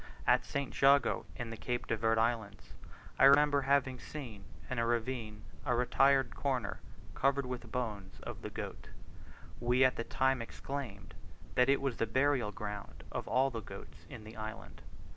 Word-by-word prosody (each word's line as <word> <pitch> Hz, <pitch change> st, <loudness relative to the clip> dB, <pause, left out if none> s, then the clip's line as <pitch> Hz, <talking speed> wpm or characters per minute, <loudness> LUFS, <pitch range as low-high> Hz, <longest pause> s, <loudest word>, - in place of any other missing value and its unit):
At -, -, +4 dB
St. 140 Hz, -2 st, -3 dB
Jago 140 Hz, +1 st, +4 dB
in 120 Hz, -3 st, -5 dB
the -, -, -4 dB
Cape 120 Hz, +1 st, -2 dB
de 115 Hz, -, 0 dB
Verd 115 Hz, +1 st, +1 dB
Islands, 110 Hz, -3 st, -1 dB, 0.5 s
I -, -, +8 dB
remember 145 Hz, +1 st, +6 dB
having 135 Hz, -2 st, +2 dB
seen 115 Hz, -10 st, -8 dB, 0.2 s
in 130 Hz, -3 st, -2 dB
a 115 Hz, -, +2 dB
ravine 115 Hz, -3 st, -2 dB, 0.2 s
a 125 Hz, -, +1 dB
retired 135 Hz, +2 st, +3 dB
corner 130 Hz, -7 st, -1 dB, 0.3 s
covered 140 Hz, 0 st, +1 dB
with 125 Hz, -2 st, -6 dB
bones 105 Hz, -6 st, -4 dB
of -, -, -7 dB
the -, -, -5 dB
goat; -, -, -7 dB, 0.7 s
we 125 Hz, +2 st, +3 dB
at 130 Hz, -, +2 dB
the 115 Hz, -, -1 dB
time 130 Hz, +1 st, +1 dB
exclaimed 115 Hz, -, -6 dB, 0.4 s
that 125 Hz, +1 st, +4 dB
it 140 Hz, -, +4 dB
was 135 Hz, -4 st, -1 dB
the 115 Hz, -, 0 dB
burial 130 Hz, -2 st, +2 dB
ground 105 Hz, -1 st, -7 dB
of -, -, -4 dB
all 130 Hz, +3 st, +2 dB
the 115 Hz, -2 st, -4 dB
goats -, -, -11 dB
in 110 Hz, -, -9 dB
the 110 Hz, +2 st, -11 dB
island. 110 Hz, 0 st, -7 dB
125 Hz, 170 wpm, -33 LUFS, 110-135 Hz, 0.7 s, I